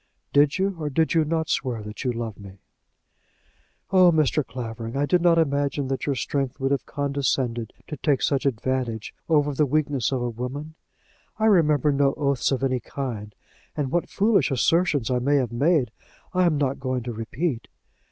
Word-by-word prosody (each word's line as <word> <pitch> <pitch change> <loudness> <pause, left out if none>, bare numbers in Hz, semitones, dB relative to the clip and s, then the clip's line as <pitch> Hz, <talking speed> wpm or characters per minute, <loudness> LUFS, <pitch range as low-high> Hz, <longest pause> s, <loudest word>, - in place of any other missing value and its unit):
"Did 145 +1 +4
you 190 -1 0
or 150 -2 -2
did 160 +3 +1
you 165 -2 +4
not 160 +1 -1
swear 125 -7 -1
that 105 +1 -7
you 125 - +1
loved 115 -3 -5
me?" 100 -1 -11 1.3
"Oh, 185 -2 +6
Mr. 155 -1 +2
Clavering, 115 0 -6
I 145 - +2
did 180 +4 +2
not 170 -1 +4
imagine 140 -3 0
that 135 +1 -3
your 140 - +1
strength 135 0 -2
would 135 0 0
have 140 - -1
condescended 135 -5 -1
to 150 - -7
take 140 -1 +1
such 140 0 +1
advantage 125 -2 -2 0.2
over 150 -2 +3
the 150 +2 +2
weakness 140 -3 0
of 130 -2 -1
a 120 - -1
woman. 130 +7 -6 0.6
I 220 - +1
remember 155 - +4
no 140 -1 +2
oaths 140 -3 0
of 135 0 -1
any 130 -2 +1
kind, 115 -7 -6 0.4
and 140 -3 -1
what 175 - 0
foolish 205 -2 +2
assertions 145 -2 +2
I 125 - +2
may 140 +4 +2
have 130 -5 +1
made, 135 -1 +2 0.4
I 185 -1 +3
am 155 -3 +1
not 135 -2 0
going 130 -2 -2
to 120 0 -4
repeat. 115 +5 -3
140 Hz, 180 wpm, -24 LUFS, 125-155 Hz, 1.3 s, Oh